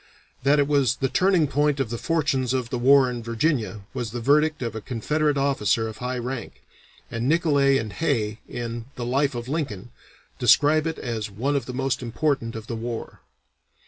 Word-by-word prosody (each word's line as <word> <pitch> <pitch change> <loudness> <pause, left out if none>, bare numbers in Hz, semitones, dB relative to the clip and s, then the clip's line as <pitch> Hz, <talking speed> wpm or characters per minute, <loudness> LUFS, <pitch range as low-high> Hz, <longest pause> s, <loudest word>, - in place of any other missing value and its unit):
That 140 +3 +4
it 140 -1 +3
was 140 -4 +2
"the 135 -1 -1
turning 180 +3 +3
point 145 +1 +1
of 125 -5 -1
the 120 - -2
fortunes 140 -6 0
of 125 -2 -2
the 125 - -1
war 135 +1 +6
in 120 -1 -4
Virginia," 115 - -1
was 120 - -3
the 120 +3 -5
verdict 150 +4 +2
of 115 -2 -4
a 110 - -4
Confederate 145 +6 0
officer 115 -5 +1
of 110 -1 -7
high 125 +1 -3
rank, 125 0 -6 0.5
and 115 +3 -1
Nicolay 145 -4 +3
and 110 -5 -4
Hay 115 -9 -1
in 115 -1 -5
the 120 - -4
"Life 135 +2 +1
of 120 0 -5
Lincoln" 125 - -4 0.5
describe 155 +2 +4
it 160 - -3
as 115 -3 -4
"one 125 +9 -1
of 135 -4 -1
the 125 - -5
most 135 0 -1
important 120 -1 -1
of 110 -1 -6
the 115 - -4
war." 115 0 -6
130 Hz, 190 wpm, -24 LUFS, 115-145 Hz, 0.5 s, war